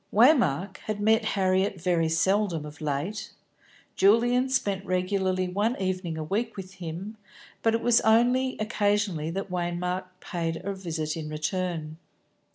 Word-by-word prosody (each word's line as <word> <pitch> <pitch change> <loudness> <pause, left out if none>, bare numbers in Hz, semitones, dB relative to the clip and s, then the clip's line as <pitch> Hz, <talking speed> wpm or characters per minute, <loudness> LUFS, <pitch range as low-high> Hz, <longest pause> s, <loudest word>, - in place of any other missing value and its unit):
Waymark 205 - +4
had 215 -1 -2
met 220 +2 +3
Harriet 190 0 +1
very 170 -2 +1
seldom 175 -1 +1
of 150 +1 -11
late. 155 +8 -3 0.7
Julian 240 +6 +4
spent 200 -7 0
regularly 185 0 0
one 205 +7 0
evening 185 -3 -2
a 155 - -3
week 215 +7 -2
with 190 -1 -7
him, 180 +6 -6 0.4
but 225 0 +3
it 230 - -1
was 240 -1 +4
only 245 +4 +3
occasionally 205 -6 0
that 195 +2 -4
Waymark 180 +1 -2
paid 165 -3 -3
a 200 - -1
visit 165 -5 -3
in 155 -2 -5
turn. 160 -1 -3
190 Hz, 140 wpm, -27 LUFS, 170-215 Hz, 0.7 s, Waymark